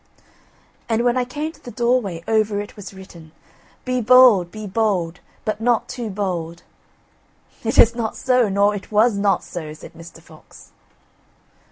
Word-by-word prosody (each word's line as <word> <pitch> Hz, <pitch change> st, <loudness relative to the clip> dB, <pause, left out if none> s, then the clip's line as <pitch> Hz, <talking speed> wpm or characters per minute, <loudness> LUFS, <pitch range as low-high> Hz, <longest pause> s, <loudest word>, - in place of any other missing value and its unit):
"And 230 Hz, +1 st, +1 dB
when 245 Hz, 0 st, +2 dB
I 250 Hz, -1 st, 0 dB
came 300 Hz, +5 st, -4 dB
to -, -, -23 dB
the -, -, -8 dB
doorway 235 Hz, -9 st, -1 dB
over 215 Hz, -2 st, +1 dB
it 205 Hz, +1 st, -7 dB
was 205 Hz, -2 st, -9 dB
written: 170 Hz, -5 st, -14 dB, 0.5 s
BE 255 Hz, -1 st, -1 dB
BOLD, 235 Hz, -6 st, +6 dB
BE 215 Hz, +3 st, -8 dB
BOLD, 190 Hz, -5 st, -1 dB, 0.3 s
BUT 215 Hz, 0 st, -2 dB
NOT 240 Hz, 0 st, +1 dB
TOO 240 Hz, -3 st, -5 dB
BOLD. 175 Hz, -4 st, -4 dB, 1.0 s
"It 225 Hz, -, -2 dB
is 230 Hz, -, +7 dB
not 230 Hz, -2 st, -3 dB
so, 250 Hz, -4 st, +2 dB
nor 200 Hz, +1 st, +2 dB
it 205 Hz, +1 st, -8 dB
was 215 Hz, +1 st, +3 dB
not 200 Hz, 0 st, +1 dB
so," 155 Hz, -3 st, -7 dB
said -, -, -13 dB
Mr. 165 Hz, 0 st, -13 dB
Fox. 160 Hz, -1 st, -17 dB
210 Hz, 160 wpm, -21 LUFS, 185-240 Hz, 1.0 s, is